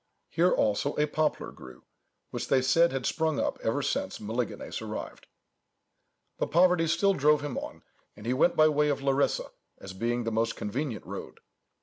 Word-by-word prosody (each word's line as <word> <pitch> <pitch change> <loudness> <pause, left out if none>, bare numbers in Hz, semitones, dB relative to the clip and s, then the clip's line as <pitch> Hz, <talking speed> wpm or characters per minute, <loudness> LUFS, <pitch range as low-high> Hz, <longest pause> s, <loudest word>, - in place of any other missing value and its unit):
Here 170 +3 +3
also 110 +7 +1
a 150 - +2
poplar 155 +1 -1
grew, 65 -1 -13 0.5
which - - -4
they 130 - +3
said 170 +5 +4
had 135 -2 -3
sprung 160 -2 0
up - - -1
ever - - 0
since - - -2
Melesigenes 115 +2 -4
arrived". - - -7 1.1
But - - -1
poverty 175 0 +4
still 195 +5 +3
drove 150 -2 +3
him 145 -4 -4
on, - - -6 0.3
and 105 - -12
he 120 - +1
went 155 +6 +3
by 155 - +6
way 150 -1 +2
of 140 -1 -1
Larissa, 140 0 +1 0.3
as 95 - -9
being 120 +5 -1
the 115 - -2
most 115 +1 0
convenient 120 +3 -4
road. - - -8
140 Hz, 175 wpm, -28 LUFS, 115-155 Hz, 1.1 s, by